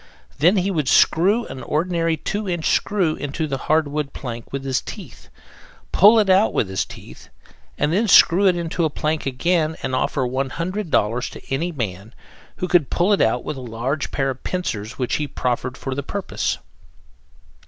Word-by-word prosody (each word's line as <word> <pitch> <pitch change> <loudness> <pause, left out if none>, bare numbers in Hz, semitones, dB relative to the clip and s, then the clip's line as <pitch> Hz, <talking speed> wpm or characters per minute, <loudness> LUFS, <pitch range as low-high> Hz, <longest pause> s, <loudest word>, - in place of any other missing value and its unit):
Then 175 +8 +4
he 190 +1 +1
would 155 -7 -1
screw 200 +8 +4
an 130 - -8
ordinary 165 +1 0
two 205 +5 -3
inch 175 -3 0
screw 185 -6 +1
into 145 +3 -4
a - - +2
hardwood 150 0 0
plank 120 -4 -7
with 135 0 -4
his 130 -1 0
teeth, - - -10 0.6
pull 210 +5 +7
it 215 -2 +3
out 190 +3 +4
with 100 - +1
his 95 - -1
teeth, - - -13 0.5
and 150 - +1
then 215 +5 +2
screw 195 +1 +6
it 180 - +4
into 170 0 -3
the 160 - +2
plank 155 0 -2
again 160 +4 0
and 130 - -2
offer 130 +2 0
$100 135 - -1
to - - -8
any 165 +6 -1
man 110 - -5 0.4
who 180 - -3
could 175 -6 +3
pull 185 +4 +2
it 200 - +2
out 115 +2 +2
with 150 - -5
a - - -7
large 125 +5 -3
pair 135 -1 -1
of 130 - -10
pincers 115 - -3
which 125 -2 -1
he 150 - -2
proffered 125 0 -2
for 135 - -4
the 140 - -3
purpose. 195 +8 -3
155 Hz, 180 wpm, -21 LUFS, 130-180 Hz, 0.6 s, pull